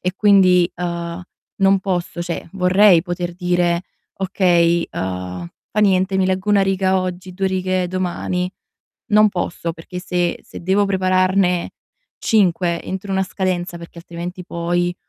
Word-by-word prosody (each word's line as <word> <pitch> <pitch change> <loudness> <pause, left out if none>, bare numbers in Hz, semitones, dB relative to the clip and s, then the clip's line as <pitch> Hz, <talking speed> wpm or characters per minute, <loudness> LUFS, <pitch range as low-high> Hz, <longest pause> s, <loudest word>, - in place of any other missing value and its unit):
E 180 +1 -2
quindi, 185 -4 +5
uhm, 170 0 -4 0.3
non 195 0 +4
posso 175 -2 -2
cioè 170 -1 -5
vorrei 185 -1 +5
poter 175 -1 -4
dire: 175 -1 +1 0.3
"Okay, 175 -3 +2
uhm, 90 -2 -4 0.2
fa 210 - 0
niente 190 -1 +2
mi 190 - +2
leggo 190 +2 -1
1 200 -1 +4
riga 190 0 +1
oggi, 185 0 -5
2 195 0 -1
righe 185 -1 -1
domani." 180 0 -2 0.6
Non 215 -1 +5
posso 175 -2 -3
perché 170 +2 -8
se 180 -1 -1
se - - -10
devo 195 +3 +2
prepararne 185 -1 +1 0.5
5 180 -5 +1
entro 190 +1 -5
una 190 0 +1
scadenza 180 -2 -2
perché 170 0 -12
altrimenti 175 +2 -7
poi 175 +1 -1
180 Hz, 140 wpm, -20 LUFS, 175-190 Hz, 0.6 s, quindi